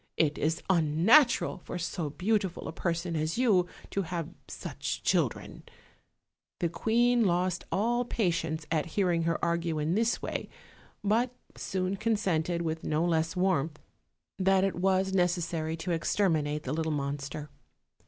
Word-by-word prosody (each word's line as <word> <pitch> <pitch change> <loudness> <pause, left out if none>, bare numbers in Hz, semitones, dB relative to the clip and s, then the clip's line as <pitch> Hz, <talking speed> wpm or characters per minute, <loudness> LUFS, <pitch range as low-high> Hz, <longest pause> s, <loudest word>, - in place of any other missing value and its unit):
It 150 -2 +2
is 160 +2 0
unnatural 190 - +4
for 180 - -6
so 165 -2 -3
beautiful 195 +3 -1
a - - -3
person 170 0 -2
as 155 +3 -1
you 205 -8 +3 0.2
to 200 - 0
have 170 -3 -4 0.2
such - - -5
children." - - 0 1.0
The 170 - +1
queen 240 +6 +2
lost 180 -2 +1
all 240 +4 +1
patience 170 -9 -1
at 160 0 +1
hearing 175 -4 +2
her 165 0 +1
argue 170 -1 0
in 155 +2 0
this 225 +4 +1
way, - - -4 0.5
but 225 +5 +2 0.3
soon 185 0 -2
consented, 180 -6 0
with 160 0 -3
no 155 +2 +1
less 165 0 +1
warmth, 170 -5 +1 0.6
that 190 0 +4
it 195 - +1
was 190 +1 +1
necessary 170 -3 0
to 175 +2 -3
exterminate 155 -3 +1
the 130 - -3
little 160 0 -1
monster. 145 0 -4
175 Hz, 140 wpm, -29 LUFS, 160-195 Hz, 1.0 s, unnatural